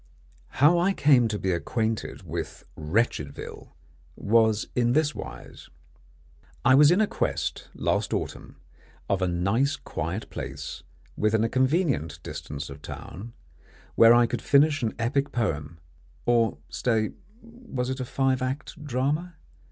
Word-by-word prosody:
How 155 +6 +5
I 185 +3 +2
came 135 -8 +4
to 105 -1 -2
be 95 -2 -1
acquainted 110 +5 -2
with - - -6
Wretchedville 75 - -2 0.4
was 110 0 +2
in 120 -1 +2
this 150 +1 +2
wise. - - -9 1.0
I 130 - +6
was 145 +2 +7
in 195 +6 +4
quest - - -2
last - - 0
autumn - - -4 0.5
of 95 -1 0
a 95 - +2
nice 100 - +1
quiet 85 - -4
place - - -6 0.3
within 110 +1 +2
a 115 - +1
convenient 130 - +1
distance 70 0 -6
of 75 +2 -10
town, 105 +11 -8 0.6
where 115 +1 +7
I 120 0 +5
could - - -3
finish 145 +1 +4
an 115 -2 -1
epic 135 +5 0
poem 80 -9 -2 0.5
or 115 -8 +2
stay, 110 - 0 0.3
was 230 - -5
it 130 - -4
a 130 - -2
five 130 0 0
act 135 +4 -4
drama? 145 +6 -1
120 Hz, 135 wpm, -26 LUFS, 105-140 Hz, 1.0 s, was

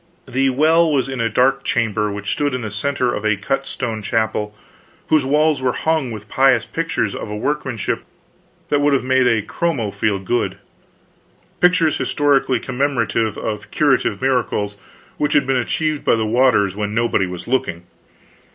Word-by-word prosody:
The 135 +1 +1
well 160 +5 +3
was 135 -3 +1
in 135 -3 -3
a 115 - +1
dark 135 +4 +2
chamber 110 -4 0
which 100 0 -4
stood 145 -3 -1
in 125 - -4
the 110 - -5
center 125 +2 -1
of 105 - -4
a 105 -1 +2
cut 135 +7 -2
stone 115 -4 -4
chapel, 105 -1 -1 0.5
whose 150 -4 +3
walls 150 0 +2
were 130 -1 +1
hung 160 -5 0
with 110 -2 -8
pious 130 +1 +3
pictures 165 -10 -2
of - - -6
a 105 - -4
workmanship 130 -3 -2 0.7
that 145 - +2
would 145 0 +3
have 135 - +2
made 130 0 +3
a 115 -4 +2
chromo 135 -11 -2
feel 100 0 0
good; 95 0 -2 1.0
pictures 175 -4 +3
historically 140 -4 +1
commemorative 125 -4 -1
of 105 -1 -4
curative 145 -4 +1
miracles 120 -6 0 0.4
which 150 0 0
had 145 - +3
been 135 0 +1
achieved 155 +5 -1
by - - +3
the 110 -1 -1
waters 110 -4 +3
when 105 0 -3
nobody 115 -5 +1
was 90 -1 -7
looking. 125 -9 -1
125 Hz, 170 wpm, -19 LUFS, 110-140 Hz, 1.0 s, well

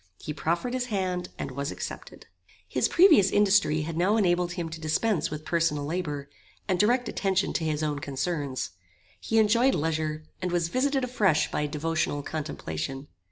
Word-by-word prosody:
He 150 - -6
proffered 170 - -1
his 255 -1 -1
hand 185 -4 -2
and - - -4
was 140 +2 -3
accepted. - - -7 0.4
His - - +1
previous 325 - +6
industry 195 -7 +3
had 160 +1 -4
now 195 +6 +3
enabled 175 -3 +2
him 170 -2 -3
to 160 0 -8
dispense 165 +4 +1
with 155 0 -6
personal 155 -3 +1
labour, 150 -3 -3 0.4
and 185 -3 +1
direct 245 +3 +3
attention 195 -1 0
to 165 - -1
his 155 -1 -1
own 150 -2 -1
concerns. 140 - -3 0.5
He 225 - -1
enjoyed 230 +5 +4
leisure, 155 0 -1 0.2
and 180 -1 -1
was 170 -1 0
visited 270 +4 +1
afresh 210 -10 +2
by 150 - 0
devotional 150 -1 -1
contemplation. 135 - -5
170 Hz, 160 wpm, -27 LUFS, 150-205 Hz, 0.5 s, previous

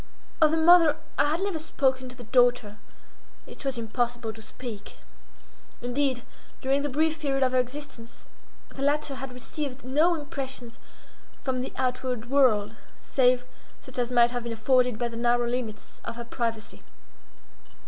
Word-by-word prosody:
Of 310 - +7
the 320 - +1
mother 325 -2 +6 0.2
I - - +5
had 315 +4 0
never 390 -5 -1
spoken 260 -4 0
to 250 - -9
the 245 - -10
daughter;—it 245 -2 -2
was 270 -2 -2
impossible 235 0 -2
to 220 - -12
speak. 220 -2 -8 0.8
Indeed, 245 0 -1 0.4
during 270 +2 +1
the 290 - -1
brief 315 +3 +1
period 275 -3 +1
of 255 - +2
her 255 - +3
existence, 250 -2 -6 0.4
the 270 - -9
latter 290 +1 +1
had 270 0 -6
received 260 +1 -5
no 310 +7 +3
impressions 270 -6 -6 0.6
from 255 -2 -1
the 260 - -4
outward 250 -1 -2
world, 250 -8 +4 0.3
save 250 -1 +2 0.3
such 260 -1 -8
as 240 -1 0
might 240 -1 +5
have 245 0 -2
been 235 0 -4
afforded 250 +1 +2
by 240 - -1
the 230 -1 -7
narrow 240 0 +2
limits 235 -3 -5
of 230 - -5
her 235 0 -6
privacy. 230 -2 -4
255 Hz, 155 wpm, -27 LUFS, 240-280 Hz, 0.8 s, Of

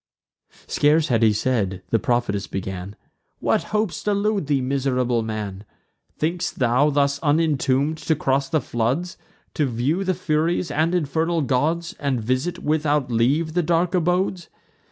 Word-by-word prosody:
Scarce 150 +2 +2
had 115 -3 +2
he 110 -1 +5
said, 105 -4 -1
the 115 - +3
prophetess 120 -7 0
began: 95 +2 -5 0.4
"What - - 0
hopes 210 -4 -1
delude 205 -4 0
thee, 145 -2 +2
miserable 130 -2 0
man? 105 -3 -5 0.5
Think'st 170 +3 -2
thou, 130 +4 +3
thus 140 -1 +1
unintomb'd, 150 -1 +1
to 160 - +3
cross 135 -1 0
the 155 - +1
floods, 130 +11 -1 0.4
To 150 -4 +1
view 130 +10 0
the 185 -1 0
Furies 165 0 0
and 160 +4 +1
infernal 165 0 0
gods, 160 +7 0
And 140 -4 0
visit, 130 +9 -1
without 150 -3 0
leave, 140 +8 +1
the 175 - +2
dark 170 +2 +1
abodes? 180 0 0
145 Hz, 140 wpm, -22 LUFS, 125-165 Hz, 0.5 s, he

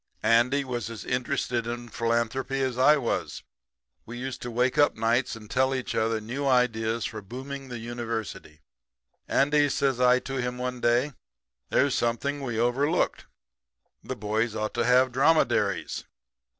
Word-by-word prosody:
"Andy 125 +5 +3
was 120 -4 -4
as 115 -2 -8
interested 125 -1 -1
in 120 0 -5
philanthropy 115 +4 -1
as 130 -2 0
I 145 +4 +5
was. 125 -5 -3 0.6
We 120 +2 -8
used 130 +1 -5
to 120 - -5
wake 125 +2 +1
up 145 - +5
of - - -23
nights 115 +3 +1
and 110 -1 -11
tell 130 +3 +1
each 130 - -3
other 110 0 +1
new 125 +6 -3
ideas 115 -3 +1
for 110 -5 -5
booming 130 +6 -7
the 120 - -5
University. 115 -9 -5 0.7
"'Andy,' 145 +1 +3
says 135 -2 0
I 125 0 +6
to 135 0 -5
him 125 0 -3
one 125 0 -4
day, 125 +5 +2 0.6
'there's 140 -1 +2
something 135 +5 -1
we 120 -5 -3
overlooked. 140 +8 +1 0.8
The - - -5
boys 110 +2 -1
ought 110 -1 -2
to 120 -1 0
have 125 +1 +4
dromedaries.' 145 +6 +2
125 Hz, 155 wpm, -27 LUFS, 115-135 Hz, 0.8 s, I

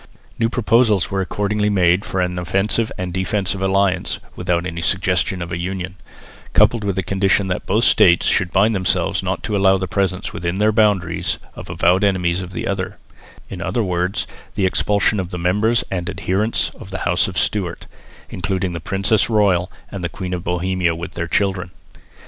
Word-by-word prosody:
New 115 -1 +2
proposals 115 -4 +2
were 95 -1 0
accordingly 105 +2 -1
made 90 -1 +3
for 95 - -2
an 90 0 -1
offensive 95 +5 0
and 90 -1 -4
defensive 95 +1 -1
alliance 95 -1 +1 0.2
(without 90 -1 -1
any 85 -1 -4
suggestion 90 +2 0
of 85 - -8
a 85 - -3
union), 90 +1 -4 0.6
coupled 115 -3 +4
with 100 -2 -1
the 95 - -1
condition 95 +1 +1
that 90 - -3
both 110 +4 +2
States 85 -6 +5
should 95 -3 +2
bind 105 +4 +3
themselves 95 -4 0
not - - -3
to 105 - -2
allow 95 -1 +4
the 95 0 -3
presence 95 -2 -1
within 85 +2 -3
their 105 +1 +3
boundaries 100 -6 +1 0.2
of - - -9
avowed 90 +4 +2
enemies 90 -3 +1
of 90 0 -7
the - - -4
other 100 0 -3 0.5
in 90 - -7
other 95 +7 -1
words 90 0 -1 0.3
the 95 - +1
expulsion 100 +2 +2
of 90 -2 -3
the 90 - -5
members 105 +7 +2
and 90 -2 -2
adherents 105 +5 -1
of - - -10
the 95 - -5
house 90 0 +3
of 95 - -6
Stewart, 95 -5 -1 0.5
including 90 +1 -2
the 85 - -4
princess 100 +6 +1
royal 95 -5 +2 0.2
and 100 -3 -6
the 85 - -1
Queen 90 +2 -5
of 90 -1 -3
Bohemia 90 -1 0
with 85 +1 -6
their 85 0 -4
children. 95 0 0
95 Hz, 185 wpm, -20 LUFS, 90-100 Hz, 0.6 s, States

